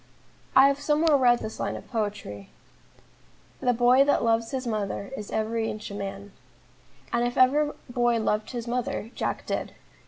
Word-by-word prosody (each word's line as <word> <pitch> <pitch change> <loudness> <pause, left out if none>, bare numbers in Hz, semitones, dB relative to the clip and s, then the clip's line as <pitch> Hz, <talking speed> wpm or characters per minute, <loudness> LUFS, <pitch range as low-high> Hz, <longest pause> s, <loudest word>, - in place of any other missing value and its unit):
I 265 +1 +8
have 280 0 +1
somewhere 300 +1 +3
read 245 -3 +4
this 220 - -6
line - - -2
of - - -9
poetry: 205 - -4 1.1
"The 250 - +2
boy 245 +3 +5
that 285 - +2
loves 230 0 +1
his 265 -2 -3
mother 210 -1 -3
Is 210 -5 -7
every 220 +1 -1
inch 210 -1 -6
a - - -6
man," 200 0 -6 0.8
and 235 0 +2
if 245 0 -2
ever 290 +4 +4
boy 240 -1 +1
loved 215 -1 -1
his 240 -2 -5
mother, 240 -2 -3
Jack - - -3
did. - - -3
235 Hz, 165 wpm, -26 LUFS, 215-255 Hz, 1.1 s, I